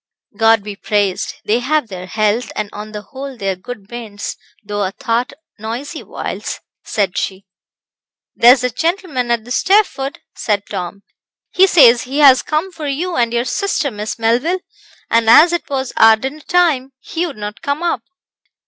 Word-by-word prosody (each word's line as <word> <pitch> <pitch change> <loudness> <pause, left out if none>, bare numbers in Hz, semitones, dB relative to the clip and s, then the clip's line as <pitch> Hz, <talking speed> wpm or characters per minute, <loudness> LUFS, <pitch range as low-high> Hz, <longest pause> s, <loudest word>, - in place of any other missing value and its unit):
"God 225 -2 +4
be 205 -1 -6
praised, 205 -2 -1
they 225 +3 +2
have 285 +1 0
their 185 -3 -8
health; 215 +4 0
and 210 -1 -3
on 210 +1 -7
the 210 -1 -7
whole 270 +4 -8
they 195 -3 -2
are 190 - 0
good 195 +2 -9
bairns, 220 -3 -6 0.3
though 205 0 -3
a 190 - 0
thought 235 +6 -1 0.3
noisy 245 +9 -5
whiles," - - -5 0.2
said 195 -4 -1
she. 195 0 -4 0.9
"There's 245 +2 +6
a 250 - 0
gentleman 325 -6 -1
at 235 -2 0
the 245 - -10
stairfoot," 375 -6 +1 0.2
said 205 -2 -1
Tom. 185 +3 -6 0.5
"He 380 +1 +5
says 250 -10 +6
he 265 +3 -4
has 275 -3 +7
come 310 +5 -2
for 320 -4 -6
you 335 +6 -2
and 235 -2 +1
your 240 +1 0
sister, 295 0 -1
Miss 210 0 -5
Melville, 250 +11 +1 0.5
and 230 -1 +3
as 335 +8 +7
it 345 - -2
was 265 -2 -2
our 225 0 +7
dinner 265 +7 -5
time, 300 -7 +1
he 340 +6 -3
would 285 - -9
not 210 0 -6
come 290 +1 -2
up." 335 -9 0
240 Hz, 175 wpm, -17 LUFS, 210-290 Hz, 0.9 s, has